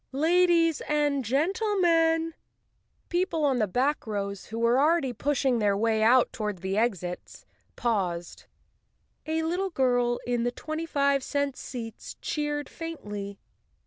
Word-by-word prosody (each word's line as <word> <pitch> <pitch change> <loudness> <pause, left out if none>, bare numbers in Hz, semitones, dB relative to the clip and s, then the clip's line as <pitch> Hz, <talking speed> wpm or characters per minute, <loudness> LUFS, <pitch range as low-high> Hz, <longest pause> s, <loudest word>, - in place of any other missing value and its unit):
Ladies 330 +1 +3
and 295 -2 +1
gentlemen—" 330 - +2
Chapter - - -29
Two - - -40 0.7
People 350 -3 0
on 265 -3 +2
the 215 - +2
back 260 +7 0
rows, 200 -2 -3
who 225 - -6
were 235 +2 +3
already 300 -3 +2
pushing 270 -3 +1
their 205 -2 +2
way 220 0 +1 0.3
toward 210 -5 -4
the 190 +1 -1
exits, 195 -6 -2 0.3
paused. 185 -7 -2 0.8
A 320 +1 0
little 360 +4 -1
girl 245 -5 +1
in 245 -1 0
the 245 +1 0
twenty 310 +6 -5
five 280 -2 +2
cent 285 -1 -1
seats 230 -4 -7
cheered 295 -1 -2
faintly. 210 -12 -6
275 Hz, 135 wpm, -27 LUFS, 225-325 Hz, 0.8 s, Ladies